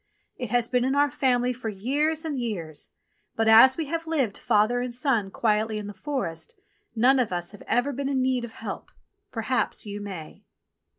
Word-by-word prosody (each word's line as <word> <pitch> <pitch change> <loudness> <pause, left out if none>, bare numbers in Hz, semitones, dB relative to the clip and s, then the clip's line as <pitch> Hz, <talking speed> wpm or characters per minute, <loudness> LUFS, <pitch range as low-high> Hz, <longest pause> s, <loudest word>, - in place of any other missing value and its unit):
It 245 -3 -5
has 240 +1 +1
been 250 0 +1
in 265 +2 +1
our 285 -1 +3
family 250 -1 +1
for 235 -2 -5
years 290 - 0
and 295 -4 -2
years; 175 -10 -4 0.5
but, 225 0 +1
as 230 +4 +8
we 325 - -1
have 330 +2 -4
lived, 270 -11 0
father 215 +4 +2
and 250 0 -3
son, 240 -5 0
quietly 215 +1 0
in 210 - -5
the 205 - -7
forest, 195 - -4 0.4
none 255 +4 +4
of 240 -6 0
us 175 0 -3
have 205 - -13
ever 260 +4 +1
been 275 +1 -2
in 270 -2 +1
need 255 -1 +1
of 230 -2 -7
help - - -7 0.2
— - - -52
perhaps - - -1
you 205 0 -6
may." 185 -6 -8
245 Hz, 195 wpm, -26 LUFS, 210-270 Hz, 0.5 s, as